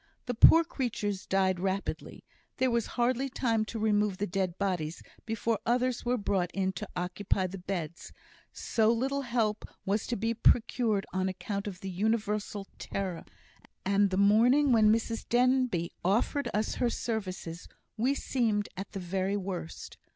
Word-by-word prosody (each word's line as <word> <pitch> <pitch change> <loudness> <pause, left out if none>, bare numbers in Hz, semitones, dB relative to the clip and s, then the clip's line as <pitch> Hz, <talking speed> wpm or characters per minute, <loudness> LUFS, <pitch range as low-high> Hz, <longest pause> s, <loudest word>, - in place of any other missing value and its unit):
The 245 - -2
poor 325 +8 +8
creatures 215 - -3
died 190 -1 +2
rapidly; 195 +1 -3 0.3
there 260 -1 +2
was 235 -1 +1
hardly 255 +2 +1
time 230 -4 0
to 225 - -6
remove 210 -2 +1
the 205 - -1
dead 185 -2 -2
bodies 175 -5 -2 0.2
before 225 -1 0
others 250 +1 +1
were 245 +1 +1
brought 195 -4 0
in 190 -1 +1
to 180 - -7
occupy 185 +2 -1
the 185 +1 -5
beds, 175 -3 -5 0.4
so 225 -1 +1
little 270 +4 0
help 230 -4 0 0.2
was 200 +1 0
to 240 - -1
be 225 +2 0
procured 225 -2 +2
on 190 0 0
account 200 +2 -4
of 185 -3 -7
the 195 - -4
universal 210 0 -1
terror; 185 -4 -4 0.6
and 200 +1 +3
the 190 - -1
morning 240 +8 +5
when 215 -3 +6
Mrs 225 0 -1
Denbigh 250 -8 +2
offered 235 +8 +1
us 215 +1 0
her 245 - +3
services, 185 -8 -4 0.3
we 250 +5 +1
seemed 220 -7 0
at 195 +1 -7
the 195 - -4
very 190 +2 -1
worst. 185 -4 -6
210 Hz, 155 wpm, -30 LUFS, 190-235 Hz, 0.6 s, poor